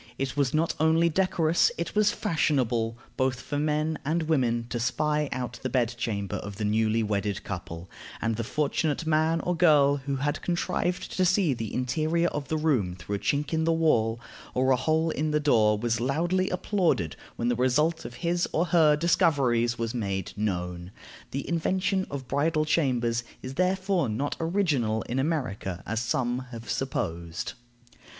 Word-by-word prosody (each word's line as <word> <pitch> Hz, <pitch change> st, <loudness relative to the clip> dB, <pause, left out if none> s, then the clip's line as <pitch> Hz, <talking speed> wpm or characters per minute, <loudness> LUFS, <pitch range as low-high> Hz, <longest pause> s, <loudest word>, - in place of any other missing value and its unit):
It 135 Hz, -1 st, -2 dB
was 140 Hz, -3 st, +1 dB
not 160 Hz, +2 st, +1 dB
only 160 Hz, +2 st, +4 dB
decorous, 170 Hz, -2 st, +2 dB
it 170 Hz, -, -3 dB
was 210 Hz, -1 st, +4 dB
fashionable, 125 Hz, -, 0 dB, 0.2 s
both 130 Hz, -1 st, +1 dB
for 145 Hz, +2 st, -3 dB
men 155 Hz, +1 st, 0 dB
and 160 Hz, +3 st, 0 dB
women, 125 Hz, -7 st, +1 dB
to 120 Hz, -, -2 dB
spy 150 Hz, +4 st, 0 dB
out 125 Hz, -1 st, -4 dB
the 130 Hz, -, -2 dB
bed 120 Hz, -2 st, +1 dB
chamber 100 Hz, -5 st, -2 dB
of 100 Hz, -1 st, -7 dB
the 105 Hz, +1 st, -3 dB
newly 110 Hz, +1 st, +2 dB
wedded 105 Hz, -2 st, -1 dB
couple, 85 Hz, -2 st, -6 dB, 0.3 s
and 115 Hz, 0 st, 0 dB
the 115 Hz, -, -2 dB
fortunate 150 Hz, +4 st, -1 dB
man 160 Hz, +1 st, +2 dB
or 180 Hz, -, -1 dB
girl 145 Hz, -5 st, +5 dB
who 140 Hz, 0 st, -3 dB
had 145 Hz, +2 st, -1 dB
contrived 175 Hz, 0 st, -1 dB
to 185 Hz, -, +3 dB
see 180 Hz, -4 st, +3 dB
the 115 Hz, -4 st, -5 dB
interior 155 Hz, +7 st, 0 dB
of 150 Hz, -2 st, -4 dB
the 160 Hz, -, -1 dB
room 130 Hz, -, +1 dB
through 90 Hz, +3 st, -6 dB
a 100 Hz, -, -1 dB
chink 145 Hz, +6 st, -1 dB
in 160 Hz, 0 st, +1 dB
the 165 Hz, -, +2 dB
wall 120 Hz, -9 st, +2 dB, 0.4 s
or 130 Hz, +1 st, +3 dB
a -, -, +6 dB
hole 160 Hz, +5 st, +1 dB
in 155 Hz, +1 st, -1 dB
the 150 Hz, 0 st, +2 dB
door 110 Hz, -8 st, +3 dB
was 115 Hz, 0 st, -1 dB
loudly 175 Hz, +8 st, +1 dB
applauded 180 Hz, -, 0 dB, 0.2 s
when 120 Hz, -, -1 dB
the 120 Hz, -, +2 dB
result 150 Hz, +7 st, +1 dB
of 120 Hz, -, -8 dB
his 175 Hz, +1 st, +1 dB
or 165 Hz, -, +1 dB
her 155 Hz, -3 st, +6 dB
discoveries 135 Hz, -7 st, +2 dB
was 115 Hz, 0 st, -2 dB
made 100 Hz, -6 st, -3 dB
known. 90 Hz, -4 st, -3 dB, 0.4 s
The 140 Hz, +1 st, -4 dB
invention 185 Hz, +3 st, 0 dB
of 135 Hz, -2 st, -6 dB
bridal 155 Hz, +3 st, +1 dB
chambers 120 Hz, -7 st, +1 dB, 0.2 s
is 130 Hz, -, -5 dB
therefore 185 Hz, -, +1 dB
not 135 Hz, +7 st, -2 dB
original 155 Hz, -, +1 dB
in 125 Hz, +3 st, -2 dB
America, 115 Hz, -, -2 dB
as 115 Hz, +1 st, -1 dB
some 120 Hz, +1 st, 0 dB
have 115 Hz, -1 st, -6 dB
supposed. 85 Hz, -10 st, -3 dB
140 Hz, 170 wpm, -27 LUFS, 115-160 Hz, 0.4 s, a